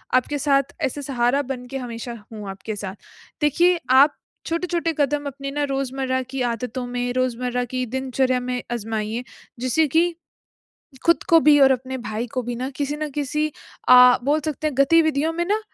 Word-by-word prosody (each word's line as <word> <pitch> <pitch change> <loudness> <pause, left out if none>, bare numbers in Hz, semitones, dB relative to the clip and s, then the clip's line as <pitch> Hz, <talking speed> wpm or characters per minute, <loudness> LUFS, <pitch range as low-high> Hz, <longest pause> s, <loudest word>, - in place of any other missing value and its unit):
आपके 275 +3 +1
साथ 275 -1 +1
ऐसे 285 +3 -2
सहारा 260 0 +1
बन 260 -2 -6
के 270 - -3
हमेशा 240 -1 -6 0.2
हूँ 210 -2 -7
आपके 195 +3 -6
साथ। 195 -2 -6 0.5
देखिए 340 +4 +3
आप 275 +3 +6 0.3
छोटे-छोटे 335 0 -1
कदम 290 +1 +1
अपने 275 0 -6
ना 290 +1 -1
रोज़मर्रा 265 -1 -1
की 270 -1 -3
आदतों 250 +2 -4
में 245 0 -2
रोज़मर्रा 250 -1 -1
की 255 0 -1
दिनचर्या 260 +1 0
में 250 0 -3
आज़माइए 225 0 -3 0.4
जिससे 255 +6 +2
कि, 335 +5 +2 0.9
ख़ुद 335 0 +4
को 330 - +7
भी 300 -1 +6
और 270 -1 +7
अपने 260 +1 -3
भाई 225 0 -4
को 255 - 0
भी 245 0 -4
ना 255 +2 -3
किसी 290 0 -2
न 305 0 -3
किसी 295 +2 -1 0.4
अ, 250 0 +8
बोल 295 +3 +2
सकते 310 0 -3
हैं 300 - -1
गतिविधियों 315 +1 +3
में 345 +1 -1
ना 415 +4 0
265 Hz, 175 wpm, -22 LUFS, 245-295 Hz, 0.9 s, अ